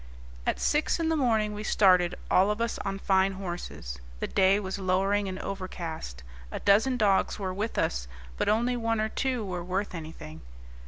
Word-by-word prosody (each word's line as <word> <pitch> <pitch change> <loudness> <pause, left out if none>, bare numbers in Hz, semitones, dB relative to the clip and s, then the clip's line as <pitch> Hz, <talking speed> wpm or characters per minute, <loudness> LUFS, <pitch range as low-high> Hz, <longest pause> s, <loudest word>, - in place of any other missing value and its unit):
At - - +1
six 300 +3 +1
in 325 -1 +1
the 325 - +2
morning 220 -7 +2
we 210 +1 -5
started, 180 -5 +4 0.2
all 190 +2 +5
of 210 +1 -1
us 235 0 -1
on 195 0 -3
fine 195 0 +2
horses. 175 - -6 0.2
The - - -1
day 195 +1 +3
was 190 -1 -4
lowering 195 +2 +1
and 185 -1 -4
overcast. 170 - -6 0.3
A - - -4
dozen 220 +6 +4
dogs 200 -4 +2
were 190 -3 -3
with 210 +4 -3
us, - - 0 0.3
but - - 0
only 235 +4 +2
one 230 -2 0
or 215 0 0
two 255 -2 -1
were 180 -2 -4
worth 185 +3 -2
anything. 160 -1 -8
195 Hz, 180 wpm, -28 LUFS, 185-215 Hz, 0.3 s, all